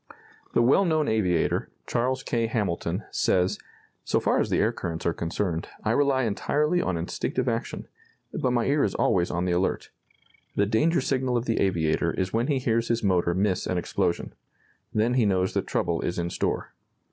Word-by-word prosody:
The 120 - +5
well 135 +11 +5
known 155 -4 +1
aviator, 90 -7 +1 0.2
Charles 130 +3 -1
K. 115 -1 0
Hamilton, 95 -3 -2
says: 90 0 +1 0.4
"So - - +1
far - - +1
as - - 0
the - - +1
air - - +3
currents 80 0 -5
are 85 - +2
concerned, 85 0 -2 0.2
I 110 - +1
rely 135 +1 +2
entirely 150 - +1
on 90 - -1
instinctive 85 +1 -2
action; - - -3 0.5
but 130 - 0
my 120 -1 +1
ear 145 +1 +2
is 100 - 0
always 90 -2 +2
on 90 +1 -1
the 90 - 0
alert. 90 +2 -1 0.6
The 100 - +3
danger 155 - +2
signal 130 -2 0
of 120 - -2
the 115 - 0
aviator 85 -3 +1
is 95 0 -2
when 115 +3 +1
he 145 -3 +1
hears 115 -2 0
his 115 -1 0
motor 90 -3 +2
miss 95 0 0
an 90 - -1
explosion. 85 0 -1 0.6
Then 110 +3 +1
he 125 -3 +3
knows 95 -1 +1
that - - -1
trouble 85 -2 0
is 85 - -2
in 85 0 -2
store. - - -2
105 Hz, 185 wpm, -26 LUFS, 90-125 Hz, 0.6 s, The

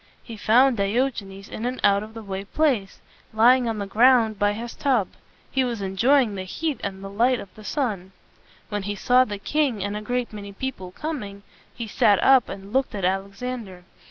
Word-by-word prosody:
He 230 - -9
found 240 +4 +4
Diogenes 200 -2 -1
in 220 - -7
an 255 +1 -4
out 200 0 +4
of 215 +1 -10
the 225 - -7
way 195 -1 -5
place, 235 -4 0 0.4
lying 240 +2 +5
on 225 - -2
the 200 - -3
ground 225 0 +4
by 205 0 +2
his 230 +3 -6
tub. 250 -8 +1 0.4
He 265 - +2
was 240 -3 -2
en 195 -1 -4
joy 265 +7 +5
ing 215 -4 -4
the 190 - -4
heat 290 - -3
and 195 -1 -5
the - - -5
light 240 +5 +2
of 195 - -10
the 215 - -13
sun. 210 -8 -2 0.6
When 205 -1 -2
he 205 +1 -4
saw 250 +5 +4
the 205 -4 -5
king 245 0 0
and 205 +1 -3
a 210 - -4
great 245 +1 -2
many 200 -1 -8
people 195 -5 -5
coming, 205 - -6 0.3
he 235 - -6
sat 205 -1 +3
up 265 -3 +5
and 195 +2 -8
looked 265 -3 0
at 195 -3 -2
Alexander. 195 +1 -4
215 Hz, 205 wpm, -24 LUFS, 200-250 Hz, 0.6 s, lying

